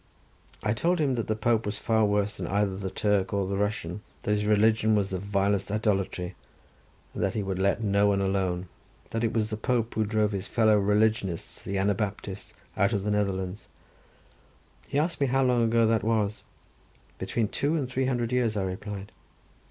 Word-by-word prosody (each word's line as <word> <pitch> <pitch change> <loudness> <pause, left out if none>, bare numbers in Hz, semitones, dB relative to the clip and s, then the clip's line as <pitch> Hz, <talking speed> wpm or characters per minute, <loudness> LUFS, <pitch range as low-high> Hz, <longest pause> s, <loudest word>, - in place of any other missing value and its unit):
I 105 +1 +2
told 175 +10 +1
him 145 -5 +1
that 115 -3 -2
the 110 - 0
Pope 110 +1 +1
was 105 0 -3
far 110 0 +2
worse 105 0 0
than - - -4
either 100 -1 +1
the 95 0 -4
Turk 100 0 0
or 100 -1 +1
the 100 +1 -2
Russian, 105 -2 -2 0.2
that - - -1
his 105 0 +1
religion 110 +1 +4
was 100 -2 0
the 95 - -2
vilest 100 0 0
idolatry, 100 -3 -1 0.8
and - - -4
that - - 0
he 105 - 0
would 95 -1 -3
let 100 +4 +1
no 100 0 +3
one 100 -1 +2
alone. 95 -2 0 0.4
That 115 +1 -1
it 115 - +2
was 110 -2 0
the 110 - -2
Pope 115 0 0
who 110 - +1
drove 105 0 +1
his 100 -1 -3
fellow 110 +1 +4
religionists 105 -2 +1
the 100 - -3
Anabaptists 100 0 -2 0.2
out 100 -1 +2
of 100 -2 0
the 105 - 0
Netherlands. 95 -2 -1 1.2
He 140 - -2
asked 160 +1 0
me 140 - +4
how 135 +1 +2
long 125 -2 +3
ago 115 0 +3
that 110 0 +2
was. 105 -2 0 0.8
Between 115 -3 -1
two 145 +9 0
and 145 -5 -1
three 130 +1 -1
hundred 120 -2 -1
years, 120 -4 +1
I 100 - 0
replied. 100 +1 -5
105 Hz, 190 wpm, -27 LUFS, 100-115 Hz, 1.2 s, religion